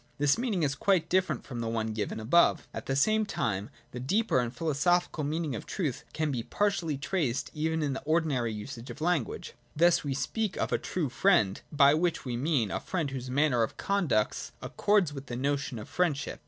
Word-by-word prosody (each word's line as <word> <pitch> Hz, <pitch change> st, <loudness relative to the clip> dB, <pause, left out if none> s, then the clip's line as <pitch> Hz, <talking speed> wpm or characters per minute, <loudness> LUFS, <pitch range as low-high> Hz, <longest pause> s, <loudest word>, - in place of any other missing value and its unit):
This 145 Hz, 0 st, +3 dB
meaning 225 Hz, -8 st, -1 dB
is 140 Hz, -2 st, +1 dB
quite 180 Hz, +4 st, +1 dB
different 180 Hz, -7 st, +1 dB
from 125 Hz, -3 st, -6 dB
the 115 Hz, -, -2 dB
one 110 Hz, -1 st, -1 dB
given 105 Hz, 0 st, -3 dB
above. 140 Hz, +11 st, +3 dB
At -, -, -6 dB
the 135 Hz, -, 0 dB
same 215 Hz, +10 st, +3 dB
time 110 Hz, -, -2 dB, 0.2 s
the 125 Hz, -, -6 dB
deeper 190 Hz, -, +1 dB
and 120 Hz, -1 st, -1 dB
philosophical 165 Hz, +4 st, +1 dB
meaning 155 Hz, 0 st, -1 dB
of 110 Hz, -, -6 dB
truth 155 Hz, -, -3 dB
can 155 Hz, -1 st, -1 dB
be 125 Hz, -4 st, -1 dB
partially 170 Hz, -, 0 dB
traced 140 Hz, -4 st, -1 dB
even 160 Hz, +1 st, -1 dB
in 140 Hz, -2 st, 0 dB
the 135 Hz, -, -4 dB
ordinary 150 Hz, -7 st, +1 dB
usage 110 Hz, +3 st, -7 dB
of -, -, -8 dB
language. 160 Hz, -6 st, -1 dB, 0.2 s
Thus 170 Hz, +3 st, +4 dB
we 140 Hz, -2 st, -2 dB
speak 215 Hz, +7 st, -2 dB
of -, -, -1 dB
a -, -, +2 dB
true 165 Hz, -7 st, -2 dB
friend; 120 Hz, -, +3 dB
by 140 Hz, -1 st, +6 dB
which 170 Hz, 0 st, 0 dB
we 125 Hz, -2 st, -2 dB
mean 125 Hz, -, +1 dB
a -, -, -1 dB
friend 165 Hz, -7 st, -2 dB
whose 130 Hz, -1 st, -5 dB
manner 135 Hz, -2 st, +2 dB
of 115 Hz, -, -1 dB
conduct 165 Hz, -, 0 dB
accords 200 Hz, -7 st, +1 dB
with 135 Hz, -1 st, -8 dB
the 120 Hz, -, -4 dB
notion 135 Hz, -1 st, -1 dB
of 105 Hz, -, -7 dB
friendship. 155 Hz, -6 st, -1 dB
145 Hz, 200 wpm, -29 LUFS, 125-170 Hz, 0.2 s, by